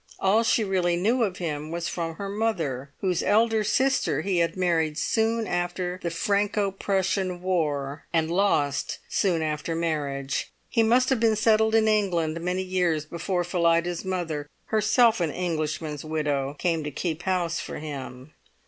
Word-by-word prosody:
All 200 +4 +3
she 230 0 +2
really 185 -3 +1
knew 225 +8 +1
of 195 -5 0
him 155 -3 -4
was 170 +1 -3
from 165 -2 -3
her 200 +4 -5
mother, 165 - -2
whose 180 -3 +1
elder 220 +1 +3
sister 260 - +1
he 185 0 0
had 170 +2 0
married 165 -4 +1
soon 225 +5 +1
after 175 0 -2
the 170 - -2
Franco 200 +3 0
Prussian 190 -1 -1
War, 150 -6 -1
and 165 -1 +1
lost 160 -7 +1
soon 175 -5 +1
after 155 +1 -2
marriage. 140 -5 -2 0.2
He 230 - +2
must 245 +3 +4
have 260 - +2
been 225 -1 +3
settled 220 0 +3
in 220 -1 +4
England 170 -7 +1
many 180 +2 -1
years 180 -5 0
before 175 +3 -2
Phillida's 170 -1 +1
mother, 170 -6 -3 0.2
herself 220 0 +3
an 165 - +1
Englishman's 155 -3 -3
widow, 145 -3 -1
came 165 -2 0
to 150 - -3
keep 160 +3 -3
house 175 -2 0
for - - -6
him. 140 -2 -7
175 Hz, 155 wpm, -26 LUFS, 155-200 Hz, 0.2 s, must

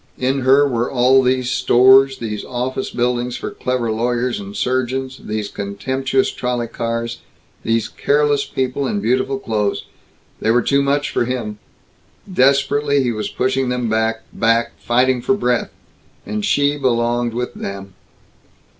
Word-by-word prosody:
In 130 +2 0
her 135 +2 +4
were 120 -2 -1
all 130 +1 +4
these 130 -1 0
stores, 130 +2 +5
these 110 -4 -4
office 130 +1 -3
buildings 125 0 -1
for - - -5
clever 125 -3 -2
lawyers 120 +2 -1
and 100 0 -8
surgeons, 130 +1 -2
these 105 -1 -3
contemptuous 130 +8 -1
trolley 125 -1 -2
cars, 115 0 -4 0.4
these 115 0 0
careless 145 0 +1
people 130 +1 -2
in 205 - -1
beautiful 130 -3 0
clothes. 110 -5 -2 0.5
They 110 - -1
were 120 +1 +3
too 140 0 +2
much 140 +1 0
for - - 0
him. 115 -4 -4 0.7
Desperately 140 -2 +2
he 120 - 0
was 110 -2 -3
pushing 130 0 0
them 125 -2 -1
back 110 0 0
back 115 +1 +1
fighting 125 +1 +2
for 200 - +1
breath. 125 - 0 0.6
And 105 0 -3
she 145 +4 +2
belonged 120 -2 0
with 125 0 -3
them. 100 -1 -7
125 Hz, 145 wpm, -19 LUFS, 115-130 Hz, 0.7 s, stores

